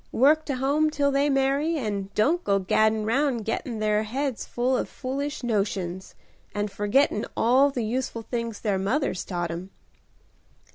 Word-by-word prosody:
Work 305 +5 +4
to 280 - -2
home 285 +4 +2
till 285 -2 +1
they 280 +1 +2
marry, 275 +4 +1
and 205 -6 -3
don't 320 +12 +2
go 200 - +2
gaddin' 215 +3 +2
'round 245 -1 +1
gettin' 230 +1 -3
their 215 0 +1
heads 255 +3 -3
full 250 +2 0
of - - -2
foolish 280 +2 -4
notions, 195 -5 -2 0.4
and 205 0 -1
forgettin' 210 +3 +1
all 260 +5 +4
the 245 -5 -2
useful 235 0 -3
things 230 -2 -4
their 200 -4 0
mothers 200 +1 0
taught 175 -2 -3
'em." 175 +3 -6
235 Hz, 155 wpm, -26 LUFS, 210-275 Hz, 0.4 s, Work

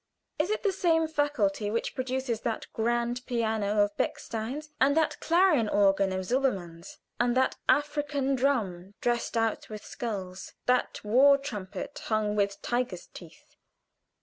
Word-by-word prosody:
Is 315 +5 +1
it 430 - -1
the 405 - +3
same 330 -4 +2
faculty 270 -10 0
which 230 +2 -2
produces 255 -3 -2
that 225 -2 -2
grand 240 +2 0
piano 220 -4 +1
of 205 0 -2
Bechstein's, 255 +8 -3
and 280 +3 +4
that 320 - +1
clarion 335 - +3
organ 195 -1 +3
of 185 0 -2
Silbermann's, 190 -10 -2 0.2
and 245 +1 +2
that 260 - +2
African 290 -2 +1
drum 205 -9 -1
dressed 240 -1 -1
out 225 -1 0
with 215 -1 -8
skulls, 190 -6 -5
that 250 0 +1
war 265 +7 +6
trumpet 210 -9 -6
hung 215 -1 0
with 200 -1 0
tiger's 240 -7 -2
teeth? 165 -2 -14
235 Hz, 140 wpm, -28 LUFS, 205-275 Hz, 0.2 s, war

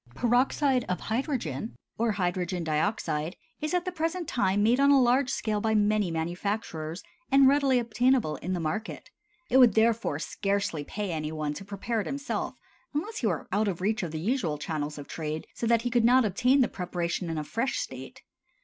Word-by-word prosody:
Peroxide 255 - +2
of 180 - -1
hydrogen, 225 - -3 0.2
or 230 -1 +1
hydrogen 180 -2 -1
dioxide, 160 0 -1 0.2
is 305 - -2
at 355 0 0
the 365 - -2
present 330 0 -2
time 200 -3 +1
made 235 +4 +3
on 280 0 +5
a 280 -1 +6
large 255 +2 +3
scale 215 -3 -1
by 220 0 +1
many 210 -2 +2
manufacturers, 170 0 -3 0.3
and 275 0 +7
readily 275 -2 +4
obtainable 240 - +1
in 185 +6 -3
the 180 - -1
market. 170 +8 -4 0.4
It 260 - +5
would 245 -6 +7
therefore 225 +1 +2
scarcely 200 -6 -2
pay 205 +5 -4
any 155 -1 -3
one 155 -2 -2
to 190 - -8
prepare 205 +3 -2
it - - -6
himself 280 +1 -3 0.4
unless 415 +10 -2
he 230 - 0
were 170 -8 -2
out 205 +3 +1
of 185 -4 -2
reach 215 +3 0
of 175 - -3
the 155 0 -5
usual 185 - 0
channels 150 0 -4
of 145 -1 -8
trade, 155 -1 -4
so 230 - -3
that 230 0 +3
he 245 - -1
could 240 -1 +3
not 250 +1 +5
obtain 250 +7 +3
the 245 - +4
preparation 175 -1 -3
in 165 - -3
a 155 - -2
fresh 230 - -2
state. - - -7
210 Hz, 195 wpm, -28 LUFS, 170-250 Hz, 0.4 s, and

